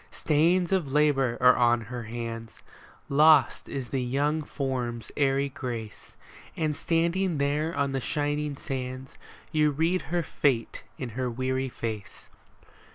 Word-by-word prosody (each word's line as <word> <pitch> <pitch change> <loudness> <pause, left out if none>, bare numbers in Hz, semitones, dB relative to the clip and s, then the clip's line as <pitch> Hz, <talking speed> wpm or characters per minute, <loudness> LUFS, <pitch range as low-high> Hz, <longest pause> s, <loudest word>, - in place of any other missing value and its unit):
MAUD - - -26
AND - - -28
MADGE - - -13
Stains 170 +4 +2
of 175 -8 +1
labor 135 -4 +2
are 125 0 +6
on 120 -1 +3
her 120 +1 -6
hands, 115 0 -6 0.4
Lost 150 -1 +4
is 130 -4 -4
the 135 - -1
young 145 +5 0
form's 125 -6 -3
airy 140 -1 +2
grace; 120 -5 -7 0.4
And 155 -2 0
standing 170 +2 0
there 145 +3 0
on 140 -1 +1
the 135 -1 -2
shining 145 0 -1
sands 130 -1 -6 0.3
You 155 -1 +3
read 165 +5 +1
her 175 0 0
fate 130 -7 0 0.2
in 125 - -4
her 125 +2 -2
weary 130 +2 -1
face. 110 -4 -6
135 Hz, 150 wpm, -27 LUFS, 125-150 Hz, 0.4 s, are